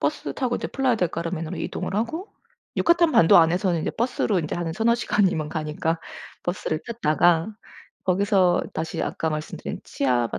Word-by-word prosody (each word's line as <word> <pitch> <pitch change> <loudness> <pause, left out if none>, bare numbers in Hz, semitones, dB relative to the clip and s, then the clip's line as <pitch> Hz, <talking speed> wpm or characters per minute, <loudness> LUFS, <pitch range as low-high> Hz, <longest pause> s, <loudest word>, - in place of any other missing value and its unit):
버스 - - -2
타고 250 -3 -1
이제 - - -3
플라야델 245 -9 +1
카르멘으로 165 -1 -4
이동을 - - -4
하고 315 - -2 0.5
유카탄 340 -1 +4
반도 165 +1 +7
안에서는 170 +1 +3
이제 - - -1
버스로 230 -4 0
인제 155 - -3
한 170 -2 -2
3-4 225 +5 +2
시간이면 190 -9 +1
가니까 160 +1 -2 0.4
버스를 175 -3 -2
탔다가 175 -6 +2 0.6
거기서 190 -1 +3
다시 160 0 -3
아까 160 - -2
말씀드린 155 0 -5
치아바 125 -4 0
175 Hz, 370 characters per minute, -24 LUFS, 160-225 Hz, 0.6 s, 반도